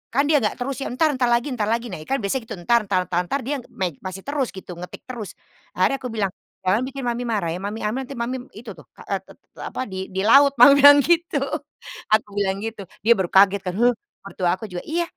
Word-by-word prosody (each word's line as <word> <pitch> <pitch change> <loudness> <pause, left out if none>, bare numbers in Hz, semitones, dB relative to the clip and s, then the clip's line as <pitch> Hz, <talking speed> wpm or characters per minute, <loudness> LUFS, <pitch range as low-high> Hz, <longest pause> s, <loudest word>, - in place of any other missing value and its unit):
kan 280 - +4
dia 300 -1 +4
enggak 210 - -1
terus 265 +2 -3
ya, 270 - -3
"Entar, 305 +5 +2
entar 255 -3 0
lagi 240 +2 +2
entar 215 -5 -1
lagi." 230 +2 -1
Nah - - -6
kan 270 - 0
biasanya 225 +5 -1
gitu, 220 - -6
entar 235 +7 +3
entar 185 -2 +1
entar 175 - 0
entar. 230 +11 -2
Dia 290 - 0 0.2
main 180 -5 -1
masih 185 0 -6
terus 285 -3 0
gitu, 190 -1 -9
ngetik 180 - -9
terus. 235 -6 -7 0.4
Akhirnya 275 - +2
aku 250 - -3
bilang, 205 -3 +1 0.4
"Jangan 200 +5 +3
bikin 275 0 -7
mami 240 +1 -1
marah 210 -7 -1
ya, 175 - -4
mami 205 +2 -4
ambil 215 +5 -1
nanti 275 - -8
mami 245 +2 -2 0.2
itu 220 +1 -9
tuh, - - -15
k - - -23
e - - +2
te - - -17
te - - -23
apa, - - -5
di 190 0 -5
di - - 0
laut." 280 +4 +7
mami 250 +4 +10
bilang 285 0 +10
gitu. 340 +2 +1 0.8
Aku 215 - -2
bilang 195 -1 0
gitu, 225 -2 -5 0.2
dia 230 +2 +6
baru 190 - 0
kaget 195 0 +5
kan, 180 - -1
"He?" 240 +4 +3 0.4
Mertua 190 -2 -2
aku - - -6
juga, 175 0 -5
iya, 340 +2 0
230 Hz, 245 wpm, -22 LUFS, 195-265 Hz, 0.8 s, mami